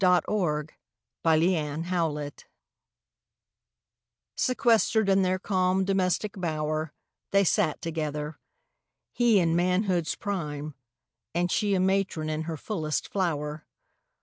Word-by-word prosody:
DOMESTIC 175 -4 +2 0.5
BLISS 160 0 +1
IV 150 -5 -2 1.9
Sequestered 225 -3 +2
in 195 0 +4
their 185 0 +1
calm 185 -1 +1
domestic 195 +1 0
bower, 155 -3 -2 0.4
They 200 0 +4
sat 155 -4 +1
together. 150 -2 -3 0.7
He 240 -3 +3
in 165 -3 +2
manhood's 180 -1 +1
prime 150 -7 -4 0.6
And 175 0 +1
she 205 -2 +2
a - - +1
matron 190 -4 0
in 155 0 -2
her 160 - -3
fullest 155 -4 -3
flower. 155 -5 -2
175 Hz, 100 wpm, -27 LUFS, 155-190 Hz, 1.9 s, in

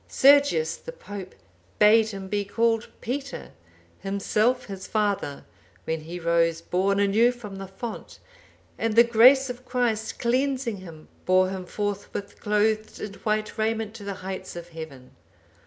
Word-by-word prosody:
Sergius 270 - +4
the - - -9
Pope 205 - -9 0.4
bade 220 +1 +6
him 195 -2 -7
be 205 +1 -1
called 225 +2 +1
Peter, 275 +3 -5 0.5
himself 210 +5 0
his 195 -2 -8
father,(799) 205 -9 -1 0.4
when 160 -1 -2
he 170 +3 -7
rose 165 -1 +2
born 190 +4 0
anew 210 +4 +4
from 215 -5 -9
the 195 0 -7
font, 205 +5 -7 0.6
and 225 -1 0
the 235 - +9
grace 250 +4 +6
of 250 0 -7
Christ, 240 -4 -1
cleansing 255 -2 0
him, 165 -5 -12 0.2
bore 185 0 +4
him 185 -2 -6
forthwith 205 0 -4
clothed 215 +1 0
in 210 - -6
white 215 0 -1
raiment 220 -1 -1
to 225 -2 -10
the 200 -1 -4
heights 190 -2 -6
of 170 0 -8
Heaven. 160 -6 -10
210 Hz, 145 wpm, -25 LUFS, 190-230 Hz, 0.6 s, the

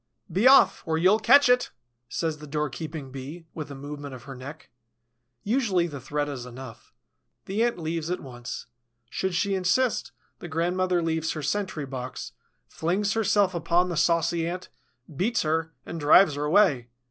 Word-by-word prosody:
"Be 195 +9 +3
off, 270 +1 +6
or 160 0 +1
you'll 185 +6 +4
catch 275 +6 +6
it!" 250 0 +3 0.4
says 160 -2 -2
the 150 - -10
doorkeeping 150 -1 -4
Bee, 140 +6 -8
with 155 -3 -6
a 140 - -7
movement 145 0 -7
of 120 - -12
her 135 - -8
neck. 140 +5 -10 0.7
Usually 210 -6 +1
the 145 -5 -6
threat 145 +3 -2
is 135 -4 -5
enough. 125 -1 -11 0.5
The 200 +4 -2
Ant 235 -4 0
leaves 165 -1 -3
at 180 - -1
once. 120 -3 -7 0.5
Should 190 -2 -2
she 200 +3 +1
insist, 195 +7 +1 0.3
the - - -7
grandmother 175 +2 0
leaves 160 -1 -1
her 155 - -5
sentry 160 -2 -2
box, 130 -1 -6 0.4
flings 195 +5 -1
herself 205 -3 +2
upon 170 +2 +1
the 175 - -2
saucy 165 0 +2
Ant, 180 +1 -5 0.5
beats 225 - +1
her, 160 +1 0
and 170 - -6
drives 150 +2 +6
her 145 +1 -2
away. 150 - +3
165 Hz, 165 wpm, -26 LUFS, 145-185 Hz, 0.7 s, off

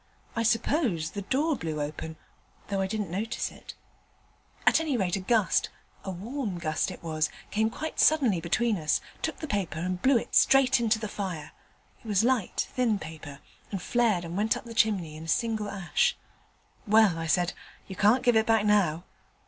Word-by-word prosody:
I 230 - 0
suppose 230 - +1
the 205 - -5
door 285 +10 0
blew 160 - -4
open, 155 +2 -5 0.5
though 195 -1 0
I 190 - 0
didn't 210 -4 -3
notice 215 +6 -2
it: - - -12 0.9
at - - +5
any 310 -5 -1
rate 185 -4 0
a - - -2
gust 210 +1 +2 0.3
a - - -5
warm 205 +2 -4
gust 155 0 -1
it 185 - -9
was 155 -2 -1 0.2
came 220 +1 +1
quite 315 +7 -6
suddenly 255 - +4
between 215 +6 +1
us, 155 -3 +1 0.2
took 320 - -2
the 310 - -6
paper 195 - -2
and 180 +2 -3
blew 265 -1 +4
it - - -5
straight 270 -2 +5
into 225 -2 +2
the 220 0 -4
fire: 185 -7 -5 0.5
it - - -12
was 205 -1 +2
light, 245 -5 0
thin 240 -4 +1
paper, 155 -5 -9 0.3
and 195 - -3
flared 220 -5 +1
and 170 +1 -6
went 215 +3 +1
up - - -10
the 230 - -8
chimney 195 -9 +1
in 155 +1 -9
a - - -10
single 220 +2 0
ash. 190 -3 0 0.7
"Well," 210 -5 +5
I 165 - -3
said, 175 +3 +1 0.3
"you 190 - -7
can't 215 +7 +3
give 245 -1 +4
it 220 +1 +3
back 225 -2 +3
now." 185 -6 +2
205 Hz, 190 wpm, -28 LUFS, 175-230 Hz, 0.9 s, at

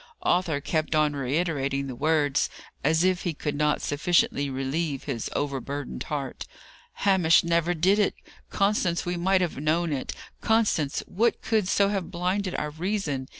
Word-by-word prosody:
Arthur 175 -5 +1
kept 155 +2 -1
on 150 -1 +3
reiterating 140 0 -1
the 135 - -5
words, 145 +1 +1 0.3
as 160 +3 +3
if 185 -1 +2
he 170 -4 -2
could 150 0 -3
not 150 0 +1
sufficiently 145 -1 +1
relieve 135 +2 -2
his 125 -6 -3
overburdened 140 - -3
heart. - - -4 0.6
"Hamish 185 -5 +5
never 170 +1 +1
did 190 +6 +3
it! 205 - +2 0.3
Constance, 195 -4 +1
we 175 0 -1
might 185 +2 +2
have 175 -3 -1
known 155 +3 0
it. 135 - -3 0.3
Constance, 210 -11 +1
what 225 +5 0
could 215 -4 +1
so 200 +1 +3
have 195 -4 -2
blinded 185 +2 -1
our 150 - -2
reason? 160 -5 -2
160 Hz, 150 wpm, -26 LUFS, 145-185 Hz, 0.6 s, Hamish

